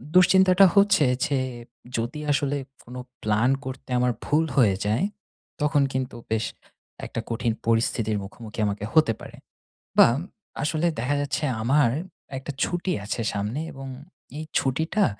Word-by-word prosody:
দুশ্চিন্তাটা 190 +1 +7
হচ্ছে 200 -6 +5 0.2
যে 140 -3 0 0.6
যদি 120 +6 -3
আসলে 145 0 +1 0.3
কোনো 125 +1 -8 0.2
প্লান 110 +3 +2 0.2
করতে 130 0 -7
আমার 125 0 +3
ভুল 155 +2 +2
হয়ে 110 -8 +5
যায়, 110 - +1 0.6
তখন 150 -1 +3
কিন্তু 130 -2 -2 0.2
বেশ 110 0 +1 0.6
একটা - - -5
কঠিন 115 0 0
পরিস্থিতির 115 -1 +1
মুখোমুখি 105 +2 -9
আমাকে 100 0 -3
হতে 155 -8 +5
পারে - - -10 0.6
বা, - - +9 0.6
আসলে 155 +2 +1
দেখা 130 +5 0
যাচ্ছে 145 +1 -2 0.2
আমার 135 +2 +4 0.5
একটা 135 +2 -5
ছুটি 175 +1 -1
আছে 110 +3 -3
সামনে 105 +6 -2
এবং 135 0 -8 0.5
এই 155 - -4
ছুটিটা 160 +10 +1
130 Hz, 135 wpm, -25 LUFS, 115-155 Hz, 0.6 s, বা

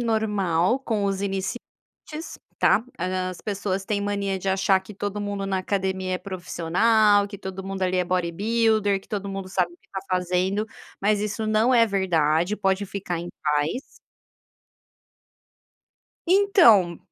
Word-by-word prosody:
normal 210 -2 +1
com 220 -6 -1
os 195 0 -1
iniciantes, 200 - -6 0.2
tá. 225 - +3
As 185 0 -2
pessoas 195 -2 -3
têm 205 0 -1
mania 200 -1 -1
de 195 - -4
achar 190 0 +3
que 190 +2 -12
todo 205 +1 -4
mundo 200 -1 -3
na 190 -1 0
academia 190 -1 -1
é - - -2
profissional, 200 +3 +2
que 200 -1 -9
todo 190 -1 -6
mundo 195 0 -4
ali 185 0 +1
é 180 - +2
bodybuilder, 200 +4 +1
que - - -23
todo 200 -2 -3
mundo 195 -1 -5
sabe 180 -2 0
o - - -17
que - - -33
está 195 - -6
fazendo, 185 +3 0 0.3
mas 205 +1 +2
isso 210 +1 -2
não 220 +4 +3
é 230 -2 +5
verdade, 175 -2 +1
pode 195 0 0
ficar 190 -3 -4
em 170 +1 -6
paz. 150 - 0 2.5
Então, 335 - +5
195 Hz, 145 wpm, -24 LUFS, 185-210 Hz, 2.5 s, é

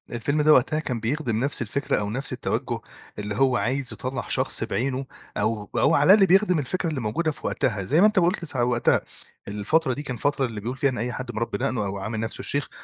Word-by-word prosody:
الفيلم 140 +6 0
ده 155 +1 +6
وقتها 150 +4 +3
كان 125 -6 -3
بيخدم 120 -1 -1
نفس 145 0 0
الفكرة 120 +3 -1
أو 105 -1 -2
نفس 135 +6 -3
التوجُّه - - -2 0.4
اللي 105 0 -3
هو 130 +1 +3
عايز 130 +2 -1
يطلّع 130 0 -4
شخص - - 0
بعينه 130 +2 -2 0.3
أو 110 -2 -1
أو - - +4
على 150 +7 +7
الأقل 205 -2 +6
بيخدم 185 -2 +4
الفكرة 165 +5 -2
اللي 145 -5 -3
موجودة 140 +10 0
في - - -6
وقتها. 105 -5 -1
زي 150 - +3
ما 210 - +8
أنت 215 -2 +2
قُلت 175 0 +1
س 145 - -6
وقتها، 120 -1 +2 0.5
الفترة 125 +9 +1
دي 145 +4 -5
كان 125 - -4
الفترة 140 +3 0
اللي 110 -4 -5
بيقول 125 +5 -4
فيها 140 +1 +2
إن 125 - -4
أي 120 +3 -2
حد 125 +1 -5
مربّي 115 +1 -2
دقنه 125 -4 -1
أو 100 0 -3
عامل 110 +3 -4
نفسه 115 0 -4
الشيخ، 145 0 -2
130 Hz, 225 wpm, -25 LUFS, 115-150 Hz, 0.5 s, ما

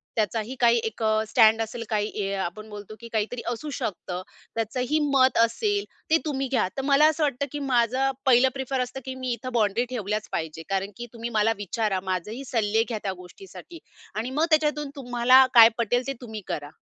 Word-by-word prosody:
त्याचाही 225 +3 -1
काही 235 -1 +5
एक 225 +1 -5
अ, 215 0 +2
स्टँड 225 -1 +5
असेल 230 +1 -4
काही 210 -1 0
हे 200 -1 -2
आपण 195 +3 -4
बोलतो, 210 0 -9
की 235 - -10
काहीतरी 220 +2 -1
असू 245 +6 -5
शकतं. 180 -2 -4 0.3
त्याचंही 250 +7 -1
मत 260 -2 +4
असेल 405 - +2 0.3
ते 325 - +5
तुम्ही 275 -3 -1
घ्या. 250 -8 +2
तर - - 0
मला 280 +2 +4
असं 315 0 -1
वाटतं 280 -2 0
की 295 - -4
माझं 260 0 +1
पहिलं 260 0 +5
प्रिफर 265 0 -3
असतं 250 +2 -4
की 260 0 -5
मी 255 -1 -3
इथे 250 +2 -6
बाउंड्री 220 +1 +1
ठेवल्याच 215 -3 -3
पाहिजे 160 0 -4
कारण 195 +1 -1
की 240 - -6
तुम्ही 230 0 -5
मला 215 +1 +3
विचारा 205 -1 -1
माझंही 195 +7 -3
सल्ले 225 -2 +1
घ्या 230 -2 -4
त्या 195 - -2
गोष्टीसाठी 335 - -12 0.4
आणि 225 +4 -2
मग 305 +4 +2
त्याच्यातून 300 -2 +1
तुम्हाला 255 0 +5
काय 230 -2 +10
पटेल, 245 +2 0
ते 275 - -1
तुम्ही 220 -3 -7
करा. 145 -1 -4
235 Hz, 195 wpm, -25 LUFS, 215-265 Hz, 0.4 s, काय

